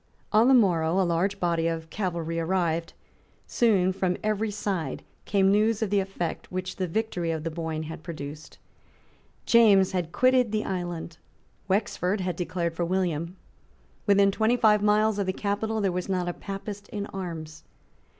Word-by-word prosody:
On 220 +3 +5
the 265 - +6
morrow 175 -6 +3
a 190 - +3
large 180 +4 0
body 170 -2 +1
of 165 -1 -4
cavalry 170 -4 -2
arrived; 165 -1 -1
and - - -37 0.4
soon 195 -6 +2
from 185 -1 -1
every 215 +1 0
side 200 -5 -3 0.2
came 195 -1 +3
news 215 +2 +2
of 205 - -3
the 205 - +3
effects 190 -4 -4
which 185 0 -4
the 185 - -1
victory 180 -2 -2
of 160 -2 -2
the 165 - -3
Boyne 160 -1 -3
had 160 0 -7
produced. 155 -2 -8 0.9
James 205 -5 +5
had 175 -3 -2
quitted 255 -1 +3
the 215 0 -1
island. 175 -3 -4 0.5
Wexford 200 0 0
had 180 -2 -2
declared 170 -1 -2
for 170 - -2
William. 170 -1 -1 0.7
Within 200 0 +5
twenty 220 +4 +2
five 210 -3 +4
miles 210 0 +3
of 200 - -1
the 185 - 0
capital 215 +2 -2
there 195 -2 +1
was 180 +1 -3
not 180 -2 0
a 175 - -1
Papist 200 +1 -7
in 205 -1 -4
arms. 165 -6 -7
185 Hz, 170 wpm, -26 LUFS, 170-205 Hz, 0.9 s, the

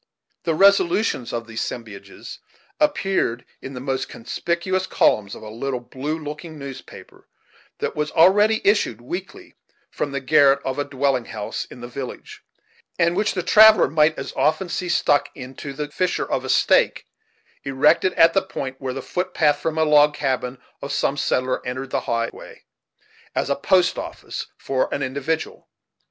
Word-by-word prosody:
The 165 -2 +1
resolutions 195 - +3
of 115 -1 -4
these 115 0 -5
as - - -4
sembiages 105 -4 -11 0.4
appeared 195 - 0 0.2
in 135 - -8
the - - -5
most 135 0 -3
conspicuous 175 +9 -2
columns 100 - +2
of - - -11
a 110 - -8
little 125 +3 -3
blue 135 +5 -5
looking 155 +1 -8
newspaper, 140 -2 -11 0.5
that - - -3
was 150 0 -1
already 205 +6 +4
issued 200 - +2
weekly 175 +10 -8 0.4
from 145 - -3
the 140 - -2
garret 140 0 +4
of 135 +1 -2
a - - +1
dwelling 135 -3 0
house 105 -2 -5
in 125 - -13
the 120 - -6
village, 130 +1 -8 0.6
and 170 +1 +2
which 210 +2 0
the 180 - -1
traveller 215 +4 +7
might 155 +1 +2
as - - -6
often 155 +4 +1
see 180 +1 -3
stuck 145 -4 +2
into 130 +1 -8
the 145 +1 -5
fissure 180 +3 -1
of - - -2
a - - -6
stake, - - +3 0.6
erected 140 +7 +3
at 165 0 +5
the 195 - +3
point 135 -8 -6
where 130 -1 -4
the 135 - -5
footpath 160 -5 0
from 160 +1 -2
the 160 0 +2
log 150 -1 +5
cabin 130 -2 -2 0.2
of 140 - -5
some 140 - 0
settler 130 -2 -1
entered 130 +1 -5
the - - +1
highway, 115 0 -4 0.7
as - - 0
a - - +2
post 180 +5 +2
office - - -7
for 130 -1 -1
an 140 - -2
individual. 140 +5 -3
145 Hz, 165 wpm, -22 LUFS, 130-175 Hz, 0.7 s, traveller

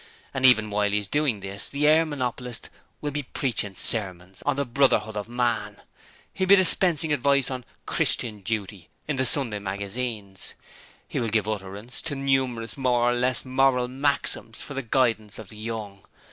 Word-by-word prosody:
And 130 -1 +4
even 110 -4 +4
while 105 0 +1
he 105 - 0
is 105 - -2
doing 140 -5 0
this 100 +1 -2
the 145 +1 -1
air 160 +2 +5
monopolist 125 -4 -4 0.3
will 145 - -3
be 145 +1 -3
preaching 120 -7 -2
sermons 95 -4 +4
on 145 - +2
the 140 0 -1
Brotherhood 120 -4 +1
of 105 +2 -5
Man; 120 -1 -2 0.5
he 190 - -2
will - - +1
be 200 - +9
dispensing 170 -4 +5
advice 140 -1 +2
on 125 -2 -5 0.2
"Christian 110 -4 +1
Duty" 100 -3 -4 0.2
in 150 -3 -2
the 130 - +1
Sunday 120 -5 0
magazines; 100 0 -4 0.5
he - - -3
will 115 - -1
give 105 -1 0
utterance 105 +3 -5
to 155 -3 -5
numerous 130 -4 -1
more 120 -2 +2
or - - +1
less 125 +1 0
moral 130 -1 +2
maxims 135 -3 -1
for 145 - -7
the 135 - -3
guidance 115 -4 0
of 110 -4 -10
the 105 - -11
young. 105 -3 -6
120 Hz, 175 wpm, -25 LUFS, 105-135 Hz, 0.5 s, be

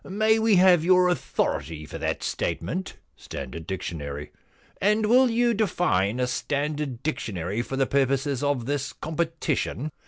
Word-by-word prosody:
* - - -32
May 215 +3 +2
we 220 -2 +4
have 180 -3 +6
your 180 +1 +5
authority 75 - -2
for - - -8
that - - -2
statement? 175 - -3 0.2
Standard 75 +5 -8
dictionary.'* 75 -6 -5 0.3
* - - -32
And 210 +2 +3
will 250 +4 +5
you 235 +1 +2
define 125 - +1
a 125 - +2
standard 140 +1 -2
dictionary 105 - -2
for 135 - -5
the 135 0 +2
purposes 135 0 +1
of 145 -5 0
this 140 +1 -2
competition 160 -3 -2
145 Hz, 150 wpm, -25 LUFS, 115-185 Hz, 0.3 s, have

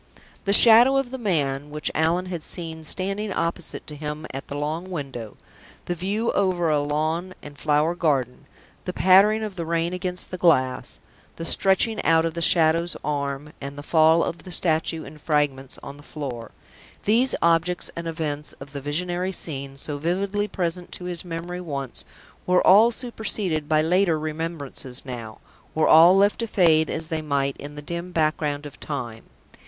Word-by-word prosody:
The 200 - +1
Shadow 235 +5 +8
of 270 -2 -1
the 260 - -5
Man, 145 - -1
which 150 0 -2
Allan 165 +3 +1
had 180 -3 -5
seen 160 -1 -7
standing 195 +5 -1
opposite 170 -1 -2
to 150 - -8
him 150 +1 -6
at 135 - -6
the 145 - -5
long 155 +5 -3
window; 135 - -6 0.5
the 175 - -2
view 200 +6 -1
over 180 -4 +1
a 150 - +2
lawn 155 +5 -2
and 145 0 -10
flower 150 +3 +1
garden; 140 -7 -1 0.4
the - - -3
pattering 200 +5 +5
of 205 -3 -6
the 170 - -2
rain 170 +1 0
against 180 -1 -4
the 185 - -5
glass; 130 -8 +1 0.4
the 165 - -6
stretching 195 +5 +3
out 165 0 +4
of 165 - -2
the 170 - -4
Shadow's 165 +1 +3
arm, 145 0 -3
and 140 +1 -7
the 145 - -7
fall 160 +1 +4
of 170 - -4
the 185 - -11
statue 160 -2 +1
in 155 - -12
fragments 145 -3 -1
on 140 +1 -9
the - - -14
floor 130 -7 -7 0.6
these 235 +5 +3
objects 170 +1 +1
and 170 0 -5
events 150 -3 -4
of 135 0 -12
the 140 - -5
visionary 175 +6 -2
scene, 140 -6 -5
so 145 +1 -3
vividly 195 +6 -1
present 175 -2 -3
to - - -5
his 180 -1 -2
memory 175 +1 -6
once, 140 -6 -5 0.4
were 180 0 +3
all 210 +5 +7
superseded 210 - -3
by 155 0 +3
later 175 0 +2
remembrances 155 -5 -4
now, 115 -4 -7 0.4
were 155 - +2
all 170 +4 +7
left 200 +1 +3
to 230 - -2
fade 160 -6 +3
as 160 0 -4
they 160 -1 -2
might 140 -2 -1
in 145 +1 -9
the 150 - -8
dim 170 +3 -5
background 155 -3 -1
of 145 - -10
time. 120 -6 -6
165 Hz, 175 wpm, -24 LUFS, 145-180 Hz, 0.6 s, Shadow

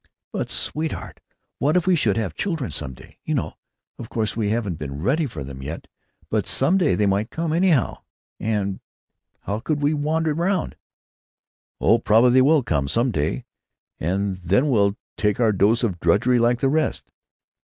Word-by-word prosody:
"But, - - -2
sweetheart, 155 +1 -3 0.4
what 150 +5 +2
if 180 - +1
we 185 -1 +4
should 110 - +1
have 110 -5 -2
children 165 - -3
some 65 -4 -5
day? - - -17
You - - -1
know—— - - -2 0.5
Of 115 - -8
course, 110 -2 -2
we 110 -2 0
haven't 105 -7 -2
been 70 -1 -5
ready 145 - +1
for 80 - -7
them 65 0 -8
yet, 75 +5 -6 0.5
but - - 0
some 170 +9 +3
day 170 -6 +2
they 105 - +1
might 100 +3 +1
come, 165 -1 -2
anyhow, 170 -6 +2 0.4
and 100 -3 -1 0.6
how 100 +2 -3
could 145 +4 -2
we 145 +2 +3
wander 155 +1 0
round——" 175 +3 -1 1.0
"Oh, 115 - +4
probably 115 +3 +4
they 130 +1 +5
will 145 +1 +4
come 70 -10 0
some 120 - +1
day, 75 -5 -2 0.5
and 95 +3 -1
then 95 - +1
we'll 100 -3 +2 0.2
take 105 0 +1
our 115 -3 +4
dose 105 +5 +2
of 95 -7 -1
drudgery 105 +9 +3
like 120 +1 +2
the 135 - +3
rest. 155 +1 -1
115 Hz, 175 wpm, -23 LUFS, 100-150 Hz, 1.0 s, they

